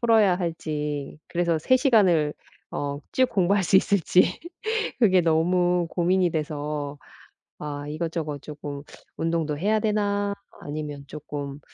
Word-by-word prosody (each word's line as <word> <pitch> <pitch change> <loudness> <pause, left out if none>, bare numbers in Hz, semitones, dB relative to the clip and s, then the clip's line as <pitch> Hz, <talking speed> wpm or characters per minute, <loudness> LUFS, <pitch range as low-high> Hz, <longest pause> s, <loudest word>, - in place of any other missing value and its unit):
풀어야 220 -6 +5
할지 150 -5 -3
그래서 170 -2 +1
3 240 - +4
을 150 -3 +2 0.4
어 145 0 -3
쭉 255 -1 +3
공부할 195 +1 +2
수 190 - +5
있을지 185 -2 +3 0.6
그게 185 -6 +5
너무 175 +2 +2
고민이 180 +1 +2
돼서, 150 -2 -3 0.6
아 145 -1 -5
이것저것 155 -2 -3
쪼끔 145 -1 -7 0.3
운동도 165 -2 -1
해야 210 +6 +2
되나, 205 -1 0 0.3
아니면 145 -1 -5
쪼끔 145 -1 -6
165 Hz, 235 characters per minute, -25 LUFS, 150-190 Hz, 0.6 s, 풀어야